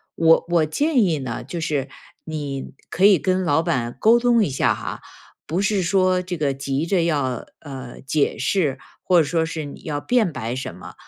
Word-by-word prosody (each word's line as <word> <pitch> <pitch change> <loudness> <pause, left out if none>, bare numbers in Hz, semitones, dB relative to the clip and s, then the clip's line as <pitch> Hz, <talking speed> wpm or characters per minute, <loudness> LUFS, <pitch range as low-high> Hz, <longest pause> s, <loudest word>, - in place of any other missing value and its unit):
我 165 0 +4
我 170 -2 +3
建 285 - +1
议 165 -6 +1
呢， 125 -4 -5
就 170 +5 -5
是， 145 -4 -1 0.4
你 145 -4 -5 0.2
可 190 - +2
以 200 -2 +7
跟 185 +2 0
老 160 0 +2
板 125 -8 -1
沟 230 +2 +6
通 240 -2 +3
一 - - -2
下 135 - +1
哈， - - -6 0.5
不 170 +5 -1
是 205 -1 +1
说 185 0 +2
这 180 0 -5
个 145 -3 0
急 135 +2 -2
着 175 0 +1
要， 140 -7 -1 0.2
呃， 135 -4 -9
解 140 +2 0
释， 155 -9 0 0.3
或 180 -2 +4
者 - - +4
说 160 +3 0
是 160 -2 -5
你 145 - -10
要 145 -2 -3
辩 230 -4 +2
白 125 -4 -4
什 130 -9 -5
么， 90 -1 -11
160 Hz, 210 characters per minute, -22 LUFS, 135-185 Hz, 0.5 s, 以